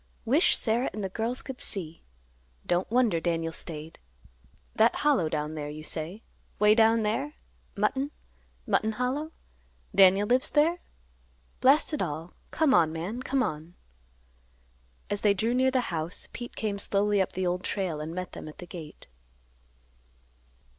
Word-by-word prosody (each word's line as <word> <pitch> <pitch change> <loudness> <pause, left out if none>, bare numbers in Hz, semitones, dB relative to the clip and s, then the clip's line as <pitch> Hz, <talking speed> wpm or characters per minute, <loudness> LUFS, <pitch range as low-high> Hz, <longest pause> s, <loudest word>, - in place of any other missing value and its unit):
Wish 280 +10 +4
Sarah 235 +3 +1
and 210 - -4
the 190 - -2
girls 230 +6 -1
could 265 -2 -7
see. 170 -5 -4 0.6
Don't 175 +1 0
wonder 235 -7 +3
Daniel 165 -1 -1
staid. 160 -1 -6 0.8
That 225 +2 +4
Hollow 270 - +2
down 150 0 -2
there 150 -2 -5
you 155 +1 -8
say; 165 +8 -4 0.3
way 210 0 +6
down 225 0 +4
there? 270 +8 -1 0.4
Mutton—Mutton 220 -1 -2
Hollow? 260 +7 -2 0.6
Daniel 195 +1 +6
lives 250 +4 +2
there? 325 +4 +3 0.8
Blast 285 +4 +4
it 300 - -1
all; 165 0 -4 0.2
come 315 -5 +2
on, 160 -9 +4
man; 180 +10 -4
come 265 0 +1
on." 160 -3 -5 1.3
As 205 -1 -2
they 205 -2 +4
drew 225 +5 0
near 260 +1 +3
the 260 -1 +2
house, 160 +2 -2
Pete 240 0 -7
came 205 -2 -2
slowly 200 0 +2
up 190 - -2
the 185 0 -2
Old 180 +1 -1
Trail 175 -6 -2
and 155 +1 -5
met 185 0 -4
them - - -8
at 155 - -10
the 180 - -8
gate. 165 -4 -10
205 Hz, 150 wpm, -28 LUFS, 165-250 Hz, 1.3 s, way